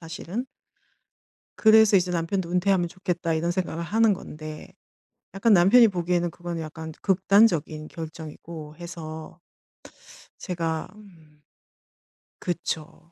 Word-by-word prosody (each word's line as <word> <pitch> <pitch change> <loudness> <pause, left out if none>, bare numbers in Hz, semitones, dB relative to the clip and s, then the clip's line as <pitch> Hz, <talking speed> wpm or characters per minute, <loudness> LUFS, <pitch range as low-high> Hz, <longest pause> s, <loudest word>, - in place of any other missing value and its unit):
사실은. 170 +8 -5 1.1
그래서 220 -2 +6
이제 180 0 0
'남편도 170 +1 -1
은퇴하면 180 -1 +2
좋겠다.' 175 -2 -2
이런 170 +2 0
생각을 175 -2 -3
하는 220 +3 +3
건데 155 -4 -9 0.6
약간 205 +3 +3
남편이 210 +7 +7
보기에는 175 -1 0
그거는 175 -1 -5
약간 160 0 -7
극단적인 185 -5 +3
결정이고 160 -1 -9
해서 165 -2 -8 1.0
제가 165 -3 -2
음. 160 -8 -18 1.0
그쵸. 165 -1 -4
170 Hz, 255 characters per minute, -25 LUFS, 160-190 Hz, 1.1 s, 남편이